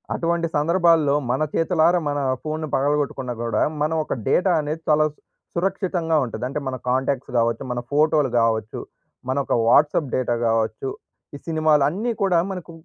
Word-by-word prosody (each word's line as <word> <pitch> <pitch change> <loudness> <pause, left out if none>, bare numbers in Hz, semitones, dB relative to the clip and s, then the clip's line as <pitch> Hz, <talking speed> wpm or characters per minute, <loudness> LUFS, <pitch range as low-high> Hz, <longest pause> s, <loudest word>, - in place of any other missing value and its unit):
అటువంటి 170 0 0
సందర్భాల్లో 165 -1 +3 0.2
మన 130 - -1
చేతులారా 170 +1 +2
మన 145 0 -1 0.2
ఫోన్‌ని 155 0 -3
పగలగొట్టుకున్నా 140 -2 -1
కూడా 115 -2 0 0.2
మనం 155 +2 +1
ఒక - - -3 0.2
డేటా 185 0 +3
అనేది 155 +2 -4
చాలా 155 0 +4
సు - - -33 0.4
సురక్షితంగా 180 -3 -1
ఉంటది. 120 - -7
అంటే 140 +3 -3
మన 130 - -2
కాంటాక్ట్స్ 130 +1 -1
కావచ్చు, 115 0 +1
మన 120 - -2
ఫోటోలు 150 -1 +3
కావచ్చు. 110 -1 -1 0.5
మన 130 - 0
ఒక - - -1
వాట్సాప్ 145 +3 +3
డేటా 125 -2 0
కావచ్చు. 115 +3 -1 0.5
ఈ - - -6
సినిమాలు 155 -3 +3
అన్నీ 215 +9 -2
కూడా 180 -3 +3
మనకు 180 -3 -7
150 Hz, 155 wpm, -22 LUFS, 130-165 Hz, 0.5 s, చాలా